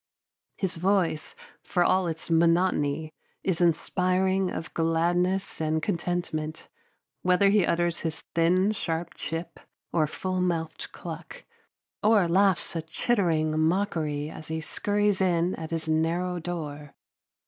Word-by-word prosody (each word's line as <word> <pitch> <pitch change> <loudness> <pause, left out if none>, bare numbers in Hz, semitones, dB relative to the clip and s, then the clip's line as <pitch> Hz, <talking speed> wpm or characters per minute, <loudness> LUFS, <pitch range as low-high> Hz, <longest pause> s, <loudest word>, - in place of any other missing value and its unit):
His 190 -4 -2
voice, 180 -3 +1 0.3
for 180 - +1
all 185 0 +3
its 165 +1 -4
monotony, 165 -3 +2 0.3
is 185 -3 0
inspiring 185 +2 +2
of 165 - -6
gladness 175 +3 +1
and 155 0 +1
contentment, 165 -2 -2 0.5
whether 180 +2 +4
he 200 -3 +4
utters 170 0 +1
his 160 -1 -4
thin, 180 +4 +3
sharp 170 -5 -3
chip 165 +2 -5 0.3
or 155 -2 +3
full 185 +4 -2
mouthed 165 -3 -2
cluck, - - -8 0.6
or 210 -4 +4
laughs 190 +1 +2
a 165 - -1
chittering 160 -4 +1
mockery 160 -4 0
as 155 - -9
he 160 0 -2
scurries 205 +4 0
in 175 -1 +2
at 160 -1 -6
his 165 -1 -3
narrow 170 +3 0
door. 150 -4 -6
170 Hz, 125 wpm, -27 LUFS, 160-185 Hz, 0.6 s, whether